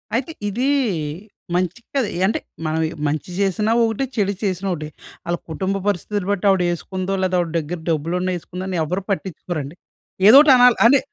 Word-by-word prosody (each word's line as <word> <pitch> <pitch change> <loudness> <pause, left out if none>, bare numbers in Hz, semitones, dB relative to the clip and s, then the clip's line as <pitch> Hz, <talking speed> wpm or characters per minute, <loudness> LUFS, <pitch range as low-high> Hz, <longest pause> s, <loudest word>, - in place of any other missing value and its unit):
అయితే 260 +7 -1 0.2
ఇది 245 +7 -1 0.9
మంచి 180 +3 -1 0.2
కాదు. 265 -5 +2 0.2
అంటే, 215 - 0 0.3
మనం 155 +1 0 0.3
మంచి 150 +4 -3
చేసినా 200 +3 +1
ఒకటే. 225 +4 0
చెడు 200 -3 +1
చేసినా 190 -1 -1
ఒకటే. 155 -2 -6 0.4
వాళ్ళ 170 0 -1
కుటుంబ 190 +4 -2
పరిస్థితిని 205 0 -1
బట్టి 205 0 -1
ఆవిడ 190 -2 +3
వేసుకుందో, 185 +2 -3
లేదా 185 -1 +1
ఆవిడ 170 -2 -1
దగ్గర 165 +3 -5
డబ్బులు 165 +2 0
ఉన్నా 185 0 -1
వేసుకుందో 180 +2 -7
అని 185 -2 -2
ఎవ్వరు 180 +5 -3
పట్టించుకోరండి. 175 -5 -4 0.5
ఏదో 260 - +10
ఒకటి 295 -3 +6
అనాలి. 245 -1 +6
అంటే, 275 +2 +5
185 Hz, 165 wpm, -21 LUFS, 170-210 Hz, 0.9 s, ఏదో